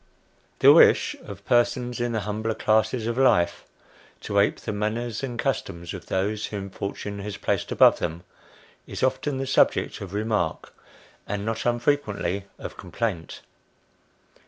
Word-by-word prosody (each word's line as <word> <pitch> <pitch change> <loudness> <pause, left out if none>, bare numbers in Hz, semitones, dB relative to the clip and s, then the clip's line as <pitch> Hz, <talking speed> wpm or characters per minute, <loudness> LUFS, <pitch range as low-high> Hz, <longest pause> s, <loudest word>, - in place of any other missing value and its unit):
THE - - +8
wish - - +5
of - - -10
persons 120 0 +1
in 120 0 -1
the 110 -2 -1
humbler 110 +2 -2
classes 110 +2 +1
of 115 +2 -1
life, 85 -10 +3 0.6
to 100 - 0
ape 100 - +2
the 110 - -4
manners 110 +2 -2
and 125 -3 -4
customs 85 -10 -3
of 90 - -9
those 105 +3 -1
whom 100 -2 -6
fortune 100 +1 -5
has 100 0 -5
placed - - -1
above - - +5
them, 85 +2 -4 0.6
is - - -5
often 135 +1 0
the 135 - -2
subject 135 - +2
of 100 0 -7
remark, 105 -5 -1 0.5
and 105 0 -3
not 115 +1 -2
unfrequently 120 -6 0
of - - -8
complaint. 95 -10 -4
110 Hz, 145 wpm, -25 LUFS, 100-120 Hz, 0.6 s, THE